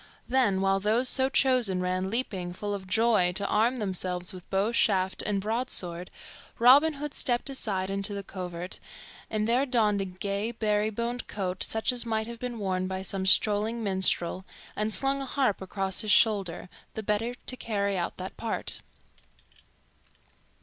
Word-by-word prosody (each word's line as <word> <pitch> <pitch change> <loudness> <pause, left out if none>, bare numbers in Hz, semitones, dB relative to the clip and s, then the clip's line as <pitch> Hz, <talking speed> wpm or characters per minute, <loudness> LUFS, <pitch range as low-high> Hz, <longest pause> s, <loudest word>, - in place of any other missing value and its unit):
Then, 240 -7 +2
while 195 0 +2
those 220 +6 +2
so 265 +1 +3
chosen 255 -9 +2
ran 185 +1 -1
leaping, 195 -6 -2
full 205 +3 -4
of 190 -2 -6
joy, 215 -3 +2
to 200 +2 -1
arm 225 +5 +2
themselves 185 -5 -2
with 180 -1 -12
bow 195 +1 +1
and 230 +2 -2
shaft 190 -4 +2
and 205 -2 -1
broadsword, 195 -5 +3 0.5
Robin 280 +7 +6
Hood 295 0 -6
stepped 245 +2 0
aside 195 -7 -2
into 195 +1 -1
the 200 - -5
covert, 180 -2 -6 0.5
and 215 0 -1
there 245 +3 +2
donned 220 -6 +1
a - - -2
gay, 200 +4 -3
beribboned 220 +2 -1
coat 185 -2 -4
such 220 +3 +1
as 245 -1 -1
might 220 -2 -1
have 235 0 -8
been 250 -2 -5
worn 185 -3 -2
by 190 0 -4
some 190 0 -2
strolling 215 +3 +2
minstrel, 190 -2 0 0.3
and 215 +1 -1
slung 270 +7 +2
a - - -3
harp 260 -8 0
across 190 0 -1
his 215 - -4
shoulder, 200 -6 +2 0.3
the 220 - -4
better 220 +4 -1
to 255 - -5
carry 200 -5 -2
out 175 -2 -3
that 185 +1 -7
part. 230 -1 -2
210 Hz, 165 wpm, -28 LUFS, 190-235 Hz, 0.5 s, Robin